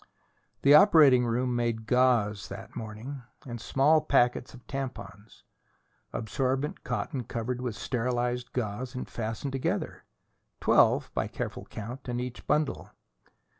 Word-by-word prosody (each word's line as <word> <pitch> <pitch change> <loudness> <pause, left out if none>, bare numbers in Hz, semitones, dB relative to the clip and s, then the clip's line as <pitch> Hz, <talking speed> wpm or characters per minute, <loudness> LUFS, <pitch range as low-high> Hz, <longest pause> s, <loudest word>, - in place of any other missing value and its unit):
The 140 - +7
operating 150 - +7
room 125 +1 0
made 115 -2 -1
gauze 115 -5 +2
that - - -9
morning, 115 +6 -7 0.2
and 120 -3 -6
small 150 +6 +3
packets 125 -4 +1
of 125 - -16
tampons: 130 -5 -7 0.7
absorbent 130 +5 -2
cotton 135 -6 -3
covered 120 +1 -4
with 120 -4 -3
sterilized 125 0 -2
gauze, 125 +2 -3
and 125 - -4
fastened 115 +4 -4
together 135 -1 -2 0.6
twelve, - - +4
by - - -1
careful - - -5
count, 120 +5 -8
in 120 0 -2
each 125 0 -6
bundle. 150 -1 0
125 Hz, 125 wpm, -28 LUFS, 115-135 Hz, 0.7 s, The